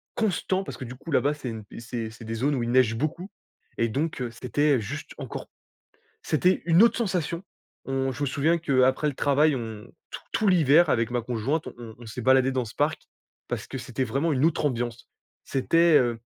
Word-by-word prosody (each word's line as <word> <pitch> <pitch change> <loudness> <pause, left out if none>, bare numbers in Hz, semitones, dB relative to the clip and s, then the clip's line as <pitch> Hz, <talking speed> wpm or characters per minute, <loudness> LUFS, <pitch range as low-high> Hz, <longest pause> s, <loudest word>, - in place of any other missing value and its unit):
constant, 195 -2 0
parce - - -8
que, 130 - -6
du 125 +2 -8
coup, 160 +5 -9
là-bas, 145 +1 +2
c'est 135 -4 -6
une, 110 -1 -5
heu - - -7
c'est 115 -1 -5
c'est 115 - -12
des 115 +1 -5
zones 140 +5 +1
où 120 - -1
il 120 - -2
neige 125 -3 +4
beaucoup. 155 - -3 0.5
Et 115 0 +1
donc, 145 +2 -2
heu, 120 -2 -3
c'était 140 +5 +1
heu - - -1
juste 100 - -6
encore, - - -7 0.7
c'était 180 +4 +2
une 170 +3 +5
autre 235 - +4
sensation. 180 -5 -1 0.4
On 135 0 -1
je 145 - -8
me 145 - +1
souviens 155 +6 +2
qu'après 135 -2 +2
le 145 - -1
travail, 145 +2 +3
on, 110 -3 -6 0.2
t - - -6
tout 215 - +1
l'hiver, 165 -3 +5
avec 115 0 +1
ma 120 -1 0
conjointe, 125 +7 -2
on 115 -2 -10
on 120 - -11
s'est 120 +3 -6
baladés 130 +1 +4
dans 130 -2 -1
ce 110 - -10
parc, 150 +2 0 0.5
parce - - -4
que 135 - -6
c'était 130 0 -3
vraiment 150 +5 0
une 130 +2 0
autre 160 -2 +1
ambiance. 120 -3 -2 0.4
C'était, 165 +4 +3
heu, 120 -2 0
135 Hz, 215 wpm, -26 LUFS, 120-155 Hz, 0.7 s, une